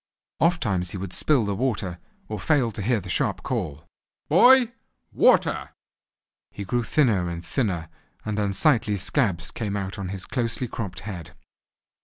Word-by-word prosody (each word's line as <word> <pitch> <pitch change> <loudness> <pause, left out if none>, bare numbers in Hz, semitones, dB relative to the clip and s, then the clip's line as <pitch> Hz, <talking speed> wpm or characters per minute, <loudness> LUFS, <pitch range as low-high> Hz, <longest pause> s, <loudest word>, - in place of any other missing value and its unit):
Ofttimes 115 - +1
he 95 - -5
would 95 -1 -6
spill 140 -8 +2
the 100 - -1
water, 100 -6 -2 0.3
or 110 - -4
fail 135 -7 +2
to 105 - -5
hear 115 +3 +1
the 95 - -10
sharp 90 - -1
call, 75 +3 -3 0.4
"Boy, 245 - +6 0.4
water!" - - +3 0.8
He 100 - -7
grew 120 +5 0
thinner 110 - +2
and 85 0 -6
thinner, 90 - -1 0.4
and 105 -1 -2
unsightly 105 - +2
scabs 95 - 0
came 105 -3 -3
out 95 0 -4
on 95 -2 -4
his 95 -1 -5
closely 120 0 -2
cropped 100 -5 -6
head. 85 -7 -8
105 Hz, 150 wpm, -25 LUFS, 90-125 Hz, 0.8 s, Boy